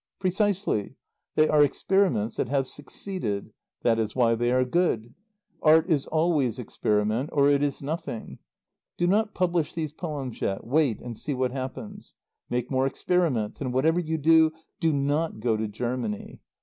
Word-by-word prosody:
"Precisely. 195 - 0 0.4
They 155 0 +5
are 150 -1 +5
experiments 165 - +1
that - - 0
have 135 -1 +1
succeeded. 145 - -5 0.3
That 115 -1 +3
is 110 -1 -2
why 120 -3 +4
they 120 +1 +1
are 130 0 +3
good. 125 -7 0 0.5
Art 160 +1 +5
is 145 -4 +1
always 155 -7 +1
experiment, 110 +1 0
or 140 -1 +4
it 140 0 +3
is 145 -1 -1
nothing. 145 -6 -5 0.6
Do 175 - +1
not 210 +4 +1
publish 175 -4 0
these 155 -3 -3
poems 145 -7 -5
yet. 95 - -2
Wait 135 -3 +2
and 120 -1 -6
see 145 +5 -3
what 130 -1 0
happens. 170 - -7 0.3
Make 125 +1 -2
more 130 0 +2
experiments. 140 -10 0
And 130 -3 -2
whatever 160 +6 +3
you 160 -2 -1
do, 160 +1 +5 0.3
do 165 -2 +2
not 145 0 0
go 115 0 +1
to 110 0 -2
Germany. 115 0 -4
140 Hz, 160 wpm, -26 LUFS, 120-165 Hz, 0.6 s, They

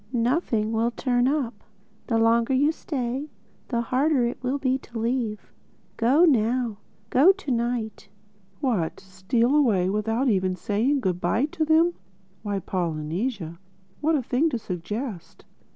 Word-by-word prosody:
Nothing 235 -3 +1
will 225 +1 +2
'turn 245 0 +1
up.' 260 -7 -2 0.4
The 230 - +1
longer 230 +3 +3
you 290 +4 +3
stay, 270 -2 -4 0.4
the 235 -2 0
harder 260 +2 +2
it 240 - -4
will 260 +2 -1
be 265 -1 0
to 240 -2 -10
leave—Go 235 +4 -1
now. 240 -5 +1 0.3
Go 295 +9 +7
to 385 -8 -6
night." 235 -4 -2 0.5
"What, 220 - -1
steal 190 +8 0
away 205 -11 +3
without 225 +5 0
even 185 -4 +1
saying 225 +10 0
good 180 -4 -1
bye 220 +9 +1
to 320 +1 -2
them! 325 +3 +4 0.5
Why, 205 -2 -2
Polynesia, 170 +1 -3 0.4
what 315 +2 +2
a 275 - 0
thing 265 +7 +1
to 255 - -2
suggest!" 205 +1 -6
235 Hz, 135 wpm, -25 LUFS, 210-270 Hz, 0.5 s, Go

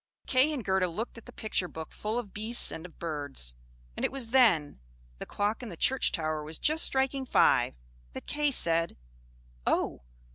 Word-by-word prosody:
Kay 265 +4 +3
and 265 -8 -4
Gerda 190 -1 +2
looked 220 +7 -5
at - - -19
the - - -9
picture 205 -4 -1
book 160 -2 -8
full 215 +2 -3
of 230 -5 -5
beasts 220 +3 +2
and 160 +2 -7
of 170 - -21
birds; 145 - -2 0.4
and - - -5
it - - +1
was 260 -4 -6
then 180 - +4 0.4
the - - -6
clock 205 +3 -1
in 245 - -6
the 170 - -9
church 265 +8 +3
tower 155 -1 -2
was 155 +1 -4
just 310 +2 +2
striking 265 0 +1
five 255 - +3 0.4
that - - -7
Kay 295 0 +1
said, 165 -9 +2 0.7
"Oh! - - 0
210 Hz, 185 wpm, -29 LUFS, 165-255 Hz, 0.7 s, then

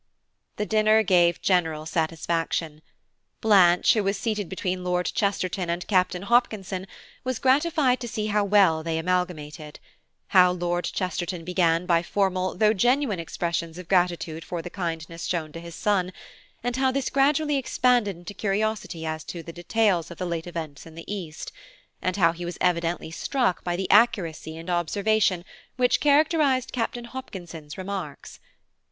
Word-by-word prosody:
The 210 - -2
dinner 215 0 +4
gave 175 -3 +3
general 160 -5 +1
satisfaction. 165 -1 -2 0.6
Blanche, 185 -5 +5
who 215 - +1
was 195 +1 0
seated 210 -5 -2
between 185 -1 -3
Lord 180 0 0
Chesterton 185 -3 -1
and 170 +1 -2
Captain 185 -2 +1
Hopkinson, 200 -5 0 0.4
was 255 -2 -2
gratified 275 0 +2
to 240 - -5
see 215 -2 -3
how 210 -1 +1
well 195 -6 +4
they 165 0 -2
amalgamated; 160 -3 -3 0.5
how 180 -1 +6
Lord 175 0 -1
Chesterton 180 -1 -3
began 175 -1 +2
by 170 -2 +3
formal 185 0 0
though 215 +1 +4
genuine 245 -1 +1
expressions 170 0 -3
of 180 -2 -9
gratitude 175 -3 0
for 170 -1 -5
the 175 - -7
kindness 165 -2 -4
shown 160 -4 -2
to 165 - -8
his 170 0 -9
son, 190 -4 0 0.5
and 245 +1 -1
how 265 0 +2
this 270 0 -2
gradually 290 +2 +2
expanded 245 -5 +2
into 175 +4 -9
curiosity 200 -5 -2
as 155 -1 -3
to 170 -2 -7
the 165 - -9
details 180 0 +1
of 170 - -10
the 185 - -3
late 170 -1 -3
events 160 -4 -6
in 160 - -13
the 165 - -9
East, 180 -6 -6 0.5
and 185 0 -1
how 165 -4 +4
he 170 +1 -8
was 175 0 -5
evidently 170 -2 0
struck 245 +2 -1
by 175 -1 -1
the 190 +1 -2
accuracy 175 -8 +2
and 165 +1 -9
observation 185 +2 +1 0.3
which 250 0 +2
characterised 290 -3 +3
Captain 240 0 -2
Hopkinson's 175 - -8
remarks. 185 -6 -6
180 Hz, 155 wpm, -25 LUFS, 170-215 Hz, 0.6 s, how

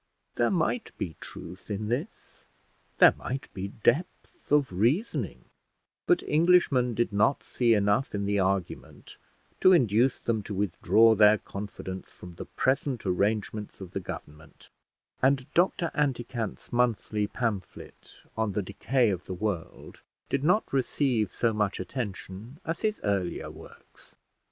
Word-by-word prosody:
There 120 - +2
might 190 +6 -1
be 80 -5 -4
truth 90 +5 -9
in 105 +1 -3
this, 140 - -5 0.5
there - - +8
might 130 +2 -5
be 95 +1 -4
depth 125 - -2
of 145 -5 +3
reasoning; 130 - 0 0.6
but 360 - +3
Englishmen 150 -7 +3
did 120 -2 0
not 105 +7 +2
see 120 -2 +2
enough 105 +5 +1
in 100 -1 -1
the 100 0 +1
argument 95 -1 -3 0.4
to 185 - +6
induce 120 - +3
them 115 -2 -1
to 100 0 -6
withdraw 105 +3 +4
their 105 0 +6
confidence 100 -2 -7
from 90 -1 -12
the 85 - -8
present 130 -2 -1
arrangements 105 +3 -1
of 95 -2 -9
the 100 - -3
government, 75 -4 -10 0.5
and 135 0 +3
Dr 175 -1 +2
Anticant's 120 -7 -2
monthly 115 -3 +1
pamphlet 105 -7 -5
on 110 -2 -1
the 105 - -1
decay 115 +5 +1
of 90 -2 -4
the 95 - -5
world 95 -4 -5 0.3
did 140 0 0
not 180 +4 +2
receive 130 -4 +1
so 115 -2 0
much 105 -2 -1
attention 110 - -6
as 165 - -3
his 215 -1 -1
earlier 95 -4 -1
works. - - -16
110 Hz, 135 wpm, -28 LUFS, 100-135 Hz, 0.6 s, there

